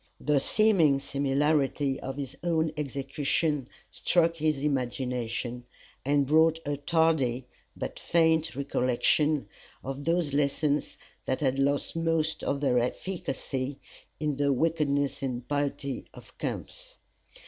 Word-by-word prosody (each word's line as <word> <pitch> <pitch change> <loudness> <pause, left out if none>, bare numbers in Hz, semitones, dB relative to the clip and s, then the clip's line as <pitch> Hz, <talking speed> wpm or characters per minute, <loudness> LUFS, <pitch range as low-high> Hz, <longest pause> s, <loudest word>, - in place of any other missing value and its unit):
The 150 -2 +2
seeming 165 -5 +4
similarity 140 0 +1
of 135 +1 -5
his 140 -3 -5
own 160 -2 +1
execution 140 0 -1 0.2
struck 165 -1 +2
his 150 -3 0
imagination, 125 -3 -2 0.4
and 140 +1 +2
brought 160 +3 +4
a 145 0 -1
tardy 145 -5 +1 0.3
but - - -5
faint 160 -1 +2
recollection 140 +2 +1 0.4
of 135 +1 -5
those 165 -3 +1
lessons 145 +1 +1 0.3
that 130 - -1
had 135 -1 +1
lost 140 +3 +1
most 165 -1 0
of 140 0 -1
their 130 -4 +3
efficacy 135 -1 -3 0.4
in 150 -2 -1
the 145 -1 +2
wickedness 145 -1 +1
and 130 -2 -1
impiety 140 -1 -2
of - - -14
camps. - - -5
145 Hz, 115 wpm, -28 LUFS, 135-155 Hz, 0.4 s, seeming